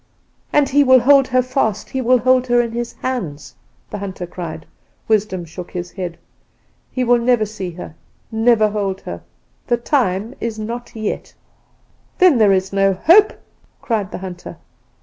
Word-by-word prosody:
"'And 295 -1 +3
he 285 +1 +4
will 260 -2 +6
hold 275 0 +5
her 255 0 +2
fast! 240 -5 -1
he 265 - -2
will 255 +1 +4
hold 255 +1 +2
her 240 0 +3
in 235 -1 0
his 235 0 -4
hands!' 180 - -4 0.4
the 210 - -5
hunter 190 -2 -5
cried. 165 -2 -7 0.4
"Wisdom 205 -5 0
shook 175 +2 -9
his 175 0 -6
head. 180 -3 -6 0.7
"'He 255 - -1
will 245 0 +3
never 235 -2 +2
see 205 -3 -6
her, 170 -2 -9 0.4
never 225 -1 +3
hold 200 -2 -3
her. - - -7 0.5
The 240 - +2
time 230 -4 0
is 230 -1 -4
not 235 +3 -6
yet.' 215 -2 -4 0.8
"'Then 360 -9 +5
there 210 -2 +5
is 190 0 0
no 195 0 +3
hope?' 345 - +5 0.5
cried 215 -5 -2
the - - -5
hunter. 185 -2 -8
220 Hz, 165 wpm, -19 LUFS, 190-250 Hz, 0.8 s, will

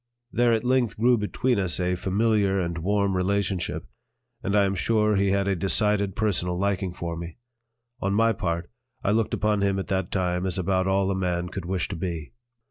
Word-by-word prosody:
There 120 0 +3
at 115 0 +1
length 125 -3 +1
grew 120 +3 +4
between 115 +3 0
us 95 -3 +1
a 90 0 +1
familiar 100 +1 +1
and 85 -2 -2
warm 100 +2 +1
relationship, 95 -3 -1 0.6
and 100 +2 0
I 100 - +5
am 95 - 0
sure 105 +2 +2
he 100 0 +2
had 100 0 +1
a 100 - +1
decided 100 +2 +2
personal 90 -4 0
liking 95 -1 0
for 85 -1 -5
me. 85 0 -7 0.6
On 100 - -1
my 115 +3 +3
part, 85 -5 -3 0.3
I 100 - +2
looked 110 0 +1
upon 105 -1 +1
him 100 -1 +1
at 95 - -4
that 95 -2 -1
time 90 -1 -1
as 90 - -1
about 95 +1 +1
all 95 0 +2
a - - 0
man 90 -1 -1
could 95 -1 -6
wish 90 -1 -1
to - - -4
be. 80 -3 -5
95 Hz, 200 wpm, -25 LUFS, 90-105 Hz, 0.6 s, I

